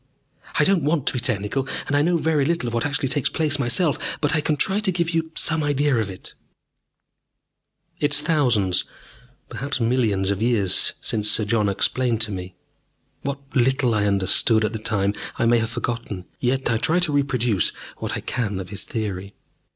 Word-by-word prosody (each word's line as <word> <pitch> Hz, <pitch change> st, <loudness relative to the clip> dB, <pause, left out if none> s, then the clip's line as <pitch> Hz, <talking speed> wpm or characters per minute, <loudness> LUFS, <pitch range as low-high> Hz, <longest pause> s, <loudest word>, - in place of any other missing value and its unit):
"I -, -, +4 dB
don't 195 Hz, -3 st, +3 dB
want 150 Hz, -1 st, 0 dB
to -, -, 0 dB
be 125 Hz, -, -1 dB
technical, 120 Hz, +2 st, -1 dB, 0.2 s
and 145 Hz, -, -1 dB
I 145 Hz, -, +4 dB
know 170 Hz, +3 st, +2 dB
very 155 Hz, -2 st, +1 dB
little 165 Hz, -1 st, 0 dB
of 120 Hz, -, -3 dB
what 120 Hz, +4 st, 0 dB
actually 145 Hz, -1 st, -1 dB
takes 135 Hz, 0 st, 0 dB
place 150 Hz, -3 st, 0 dB
myself. 140 Hz, +5 st, 0 dB
But 145 Hz, -, +1 dB
I 155 Hz, -, +2 dB
can 150 Hz, 0 st, 0 dB
try 195 Hz, +8 st, +1 dB
to 210 Hz, -3 st, 0 dB
give 170 Hz, -1 st, -1 dB
you 165 Hz, -1 st, -1 dB
some 160 Hz, 0 st, +1 dB
idea 145 Hz, -1 st, +1 dB
of 110 Hz, -3 st, -1 dB
it." 95 Hz, -, -9 dB, 1.7 s
It 145 Hz, 0 st, +2 dB
is 145 Hz, -, +4 dB
thousands, 125 Hz, -, +2 dB, 0.6 s
perhaps 140 Hz, 0 st, -4 dB
millions 115 Hz, -5 st, +1 dB
of 100 Hz, +1 st, -3 dB
years 110 Hz, -6 st, +3 dB
since 105 Hz, -1 st, 0 dB
Sir 105 Hz, 0 st, +2 dB
John 105 Hz, -1 st, +1 dB
explained 120 Hz, +4 st, 0 dB
to 110 Hz, -1 st, -2 dB
me. 90 Hz, -1 st, -6 dB, 0.7 s
What 140 Hz, 0 st, -3 dB, 0.2 s
little 130 Hz, -1 st, +2 dB
I 105 Hz, -1 st, +1 dB
understood 100 Hz, +3 st, +4 dB
at 105 Hz, -, -3 dB
the 110 Hz, -, -4 dB
time 100 Hz, -2 st, 0 dB, 0.2 s
I -, -, +1 dB
may 120 Hz, 0 st, +4 dB
have 115 Hz, 0 st, -2 dB
forgotten, 115 Hz, -6 st, -4 dB
yet 130 Hz, 0 st, 0 dB
I 115 Hz, -, +2 dB
try 160 Hz, +9 st, +1 dB
to 175 Hz, -4 st, +1 dB
reproduce 125 Hz, -, +1 dB, 0.3 s
what -, -, -4 dB
I -, -, -5 dB
can 105 Hz, -6 st, -2 dB
of 90 Hz, -2 st, -7 dB
his 100 Hz, -, -5 dB
theory. 100 Hz, -4 st, -5 dB
120 Hz, 190 wpm, -22 LUFS, 105-145 Hz, 1.7 s, I